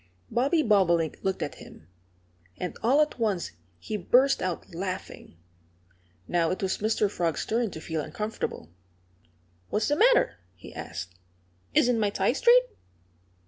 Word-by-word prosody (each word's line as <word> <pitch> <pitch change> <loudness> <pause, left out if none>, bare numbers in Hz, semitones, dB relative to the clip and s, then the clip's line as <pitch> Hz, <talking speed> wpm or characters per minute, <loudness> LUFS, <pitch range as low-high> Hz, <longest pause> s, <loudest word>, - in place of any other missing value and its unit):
Bobby 285 +6 +2
Bobolink 175 - +2
looked 190 -1 -1
at - - -6
him. 80 - -14 0.7
And 180 - -4
all 265 +6 +4
at 300 -4 -1
once 205 -6 0 0.3
he 210 - -4
burst 255 +8 +3
out 180 -2 -4
laughing. 185 - -6 0.9
Now 170 -2 +1
it 185 - -3
was 190 - -1
Mr. 215 0 +1
Frog's 170 -5 -2
turn 230 0 0
to 160 - -8
feel 160 0 -3
uncomfortable. 210 - -5 1.0
"What's 215 - 0
the 290 - +3
matter?" - - +4 0.2
he 85 - -12
asked. 85 +2 -7 0.6
"Isn't 240 -1 +4
my 210 -2 +2
tie 200 +3 +1
straight?" 485 - +6
205 Hz, 140 wpm, -27 LUFS, 170-245 Hz, 1.0 s, straight